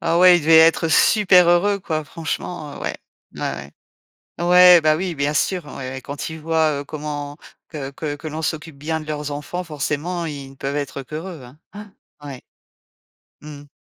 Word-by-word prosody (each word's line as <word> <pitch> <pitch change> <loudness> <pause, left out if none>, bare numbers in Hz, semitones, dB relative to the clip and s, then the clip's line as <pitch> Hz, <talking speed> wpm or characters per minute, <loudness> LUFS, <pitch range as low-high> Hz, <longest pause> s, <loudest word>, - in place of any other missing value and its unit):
Ah 170 - +1
ouais, 180 -1 +7
ils - - -5
devaient 160 +2 +5
être 165 +1 +4
super 185 0 +5
heureux, 200 +4 +3
quoi, 155 -5 -3
franchement, 160 -1 -5
heu, - - -11
ouais, - - -4 0.4
ouais, - - -9
ouais, 70 +1 -5 0.7
ouais, 180 -1 +7
bah, 155 0 +3
oui, 180 0 -3
bien 145 +1 -1
sûr, 175 +2 0
ouais, 130 0 -6
quand 140 +3 -6
ils 160 - -8
voient, 155 -2 +1
heu, - - -7
comment 145 0 -6 0.3
que 140 -4 -6
que 145 +1 -5
que 155 - -9
l'on 155 +1 -5
s'occupe 160 -1 -4
bien 160 +3 -3
de 155 - -10
leurs 150 -1 -4
enfants, 150 +5 -5
forcément, 160 +2 -3
ils 140 -4 -7
ne 135 - -16
peuvent 135 +1 -4
être 140 -1 -4
qu'heureux, 155 +1 -8
hein 125 +4 -15 0.2
hein, 205 0 -10 0.3
ouais. 135 -3 -8 1.0
Mmh 150 -1 -10
mh. 145 - -17
155 Hz, 190 wpm, -21 LUFS, 145-170 Hz, 1.0 s, ouais